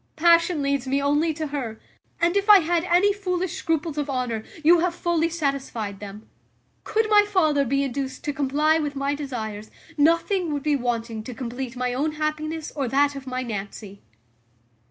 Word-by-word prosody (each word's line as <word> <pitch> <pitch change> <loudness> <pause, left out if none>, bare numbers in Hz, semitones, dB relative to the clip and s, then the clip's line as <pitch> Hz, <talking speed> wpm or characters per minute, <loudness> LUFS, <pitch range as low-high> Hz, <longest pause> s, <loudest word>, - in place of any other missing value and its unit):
Passion 335 -1 +4
leads 280 -2 -1
me 275 +2 +1
only 295 +3 +2
to 315 0 -3
her; 265 -7 -5 0.4
and, 340 +2 +2
if 400 +1 0
I 410 -2 +9
had 335 +1 0
any 370 +3 +4
foolish 370 -3 -2
scruples 320 -2 -2
of 295 0 -3
honour, 250 -4 -2 0.2
you 340 +3 +6
have 350 0 0
fully 335 -2 0
satisfied 275 -10 -3
them: 205 +1 -10 0.6
could 440 0 0
my 420 -1 +6
father 320 -9 +2
be 275 +3 +1
induced 265 0 -4
to 295 -3 -2
comply 295 +3 +2
with 295 -2 -3
my 275 +1 -1
desires, 220 -7 -5 0.3
nothing 335 +3 +2
would 285 -1 -3
be 300 -1 +2
wanting 230 -3 -2
to 250 - -7
compleat 250 +1 -5
my 250 0 -1
own 300 +5 -1
happiness 305 +1 -3
or 275 -4 -1
that 285 +3 +2
of 270 -1 -8
my 255 0 -3
Nancy." 205 -2 -7
285 Hz, 175 wpm, -24 LUFS, 255-330 Hz, 0.6 s, I